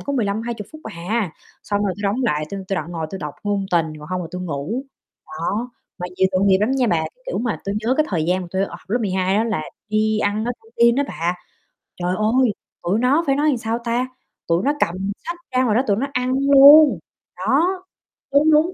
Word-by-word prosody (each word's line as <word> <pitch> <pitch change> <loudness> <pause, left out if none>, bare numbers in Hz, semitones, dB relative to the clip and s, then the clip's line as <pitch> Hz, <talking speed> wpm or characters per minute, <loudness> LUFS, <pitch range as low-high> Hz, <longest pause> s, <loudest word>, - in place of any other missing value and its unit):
có 280 - -4
15-20 225 -2 -2
phút 310 - -11
à, 200 -1 -2 0.3
xong 205 0 -1
rồi 195 - 0
tui 205 - -8
đóng 210 +6 0
lại 155 -10 +1
tui 200 - -4
tui 195 - -1
đoạn 165 0 -4
ngồi 165 -2 -3
tôi 195 - -5
đọc 150 -4 -6
ngôn 200 -1 0
tình, 170 -2 +3
còn 150 0 -11
hông 185 0 -2
là 165 - -7
tui 180 0 -5
ngủ. 170 - -3 0.4
Đó, 205 +10 -3 0.3
mà 180 - -3
nhiều 190 - +3
tội 185 +1 +2
nghiệp 190 -1 +5
lắm 215 +5 +2
nha 265 -2 +2
bà, 165 -5 +1 0.2
kiểu - - -2
mà, 235 -2 -2
tui 200 - -2
nhớ 245 +3 +2
cái 310 - +2
thời 165 -5 0
gian 180 +3 +1
mà 175 - -8
tui, 190 +1 0
ờ, - - -8
lớp 230 +5 +1
12 190 -2 0
á 220 - +2
là 215 -9 -1 0.3
đi 215 0 +1
ăn 210 +1 0
ở 245 - -1
căng 450 - -20
tin 235 0 +5
á 285 - +2
bà, 170 +2 -1 0.7
trời 180 +1 0
ơi, 230 +3 +3 0.3
tụi 190 +5 +1
nó 270 +7 +3
phải 275 - +3
nói 295 +2 +1
làm 275 - +1
sao 225 0 -2
ta, 240 +2 0 0.4
tụi 170 +3 +2
nó 285 - +2
cầm 190 0 -1
sách 345 0 -4
ra 255 0 +2
ngoài 220 -4 +2
đó 245 - +4
tụi 200 - +2
nó 270 +5 -1
ăn 250 0 0 0.2
luôn. 280 - +9 0.4
Đó, 265 - +2 0.7
đúng, 300 +3 +5
đúng, 315 +4 +4
210 Hz, 235 wpm, -21 LUFS, 185-250 Hz, 0.7 s, luôn